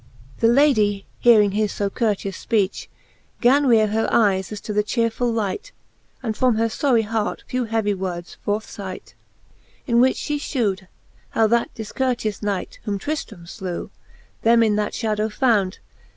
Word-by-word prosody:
The 230 - +4
Ladie, 225 -6 +3
hearing 215 -4 +5
his 210 0 0
fo 200 -1 -2
courteous 200 -4 -2
fpeach, 205 -4 0 0.5
Gan 275 +4 +4
reare 220 -3 +4
her 225 +1 +1
eyes 195 -4 +2
as 210 - -5
to 210 - -5
the 210 0 +2
chearefuU 230 +2 0
light, 220 - -3 0.5
And 220 -3 -2
from 250 -1 +2
her 225 +1 +1
iory 230 +1 +2
hart 220 -1 -2
(tw 255 -1 -1
heavie 220 -2 +1
words 180 -2 -5
forth 210 +2 -1
ligh't. 190 -2 -7
XLIII. - - -35
In 235 -2 +3
which 260 +1 +3
fhe 295 0 -1
fhew'd, 205 -10 -2 0.5
how 225 - +5
that 235 +2 +1
difcourteous 225 -1 -2
knight, 205 -3 -3
Whom 205 -1 -1
Trifiram 240 - -5
flew, 180 -1 -6 0.5
them 230 0 +5
in 215 -2 +2
that 210 0 -1
fhadow 215 -1 -1
found. 210 -6 +1
215 Hz, 160 wpm, -22 LUFS, 205-235 Hz, 0.5 s, hearing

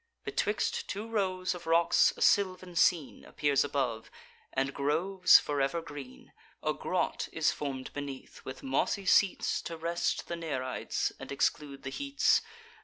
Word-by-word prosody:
Betwixt 215 - -1
two 205 +3 -4
rows 185 -5 -1
of 175 -2 -10
rocks 165 +1 +4
a - - 0
sylvan 185 -3 +2
scene 165 -4 +2
Appears 145 -2 +1
above, 130 -6 -2 0.4
and 135 +1 -1
groves 170 +7 +4
for 145 -1 -1
ever 140 +5 0
green: 145 - -10 0.3
A - - +1
grot - - -2
is - - +2
form'd 135 -3 -5
beneath, 140 -2 -7
with 130 0 -8
mossy 135 +8 0
seats, 190 +1 +3
To 165 - -6
rest 170 +1 -1
the 170 - -3
Nereids, 140 -6 -2
and - - -8
exclude 140 0 -1
the 130 - -5
heats. 280 - +2
160 Hz, 145 wpm, -30 LUFS, 140-185 Hz, 0.4 s, rocks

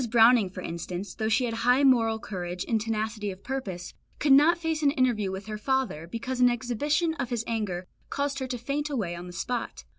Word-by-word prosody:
Browning, 230 -3 +6
for 185 0 -8
instance, 175 +3 -5
though 220 0 -2
she 235 +3 +3
had 230 - -2
high 250 +4 +3
moral 230 -5 +4
courage 180 -5 -5
and 225 -2 +1
tenacity 215 -1 -2
of 190 0 -8
purpose, 195 -10 -5 0.2
could 295 - +1
not 300 +5 +7
face 325 -2 -2
an 290 - +4
interview 250 -8 +1
with 190 +1 -5
her 215 -1 -5
father, 260 - -1
because 245 +6 -3
an 250 - +7
exhibition 290 +8 0
of 245 -2 -2
his 235 -3 -1
anger 205 -6 -2 0.2
caused 280 0 -1
her 260 - -3
to 250 -1 -3
faint 285 +5 -2
away 210 -12 -2
on 175 +1 -7
the - - -8
spot. 235 +8 -4
230 Hz, 210 wpm, -27 LUFS, 200-265 Hz, 0.2 s, not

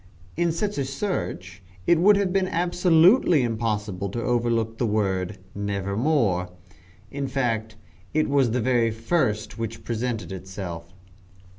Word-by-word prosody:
In 170 0 +1
such 200 +2 -2
a - - +1
search 100 - -4 0.2
it 170 -2 +4
would 205 +4 +6
have 195 -3 0
been 190 -1 +2
absolutely 175 - +4
impossible 105 -4 -2
to 115 +4 -4
overlook 115 -2 0
the 120 - +1
word 95 -2 -1 0.2
"Nevermore." 100 - 0 0.6
In 140 -1 -3
fact 115 -5 -1 0.4
it 155 0 +1
was 140 -3 +3
the 125 +2 0
very 120 -1 +2
first 110 - -1
which 115 0 -5
presented 115 -2 -3
itself. 90 -3 -7
115 Hz, 130 wpm, -25 LUFS, 100-155 Hz, 0.6 s, would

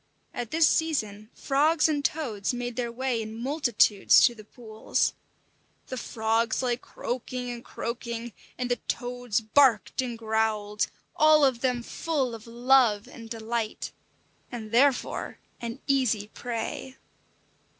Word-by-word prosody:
At 240 -2 -4
this 320 +2 +4
season 215 -10 0
frogs 305 +4 +3
and 295 -2 0
toads 245 -9 -1
made 245 -1 -4
their 240 -1 -2
way 250 -1 -1
in 220 0 -7
multitudes 240 -6 +4
to 245 - +3
the 215 -2 -12
pools. 220 0 -2 0.8
The 260 - -3
frogs 225 0 0
lay 245 -1 +1
croaking 250 0 -5
and 240 0 -7
croaking, 235 -1 -5 0.2
and 250 0 -2
the 245 - +2
toads 245 -2 -2
barked 240 +1 +3
and 245 -2 -4
growled, 220 -2 0 0.3
all 310 -1 +6
of 255 -3 +1
them 250 -2 0
full 275 -3 -2
of 225 0 -9
love 240 -2 +3
and 230 -3 -11
delight, 225 -1 -3 0.6
and 220 -3 -6
therefore 265 +3 +2 0.2
an 235 +2 -5
easy 240 -7 +1
prey. 245 +3 -5
240 Hz, 130 wpm, -27 LUFS, 225-260 Hz, 0.8 s, all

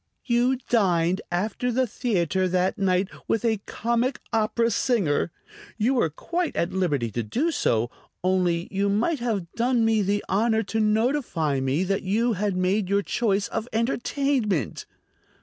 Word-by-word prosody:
"You 245 +1 +2
dined 185 -4 +2
after 215 +7 -1
the 260 +2 +2
theater 190 - 0
that 185 +2 0
night 185 -1 +2 0.2
with 225 +1 0
a 220 -3 +1
comic 235 +3 -1
opera 225 +1 +1
singer. 200 - +1 0.5
You 235 +4 +2
were 235 -11 +2
quite 340 - -3
at 170 - -1
liberty 145 -11 0
to 120 - -2
do 260 - -1
so, 115 - 0 0.3
only 180 -2 +1
you 200 0 0
might 235 +10 +1
have 210 -8 -2
done 240 -1 +2
me 220 -1 +3
the 205 +1 0
honor 220 +2 +2
to 220 - -2
notify 215 - +1
me 135 +6 0
that 195 +1 0
you 225 +5 +1
had 200 -1 -1
made 185 +2 +1
your 200 0 +2
choice 205 -3 0
of 225 - -3
entertainment." 235 - 0
210 Hz, 150 wpm, -25 LUFS, 185-235 Hz, 0.5 s, me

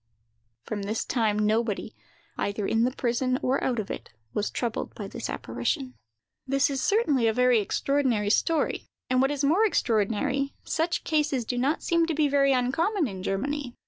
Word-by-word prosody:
From 210 -2 -4
this 210 +3 -2
time, 220 -4 +1
nobody, 215 0 0 0.4
either 200 0 -2
in 225 +3 +2
the 255 - +1
prison 255 +1 0
or 260 +2 +1
out 250 -2 0
of 215 -3 -3
it, - - -6 0.2
was 210 - -1
troubled 235 -3 -3
with 205 -2 -6
this 235 -2 -5
apparition. 120 +3 -2 0.5
This 275 +1 +2
is 270 -2 -2
certainly 300 - +2
a 220 - +2
very 250 0 +4
extraordinary 235 -1 +1
story; 325 +7 +1 0.2
and 255 0 +4
what 270 - +3
is 285 -1 -2
more 330 +10 +4
extraordinary, 260 - +1
such 330 +2 -1
cases 300 -6 0
do 245 - -2
not 280 +6 0
seem 335 -1 +2
to 325 - -1
be 300 -1 +3
very 275 -1 +3
uncommon 285 - +1
in 190 -4 -7
Germany. 250 +7 -2
255 Hz, 175 wpm, -27 LUFS, 215-285 Hz, 0.5 s, very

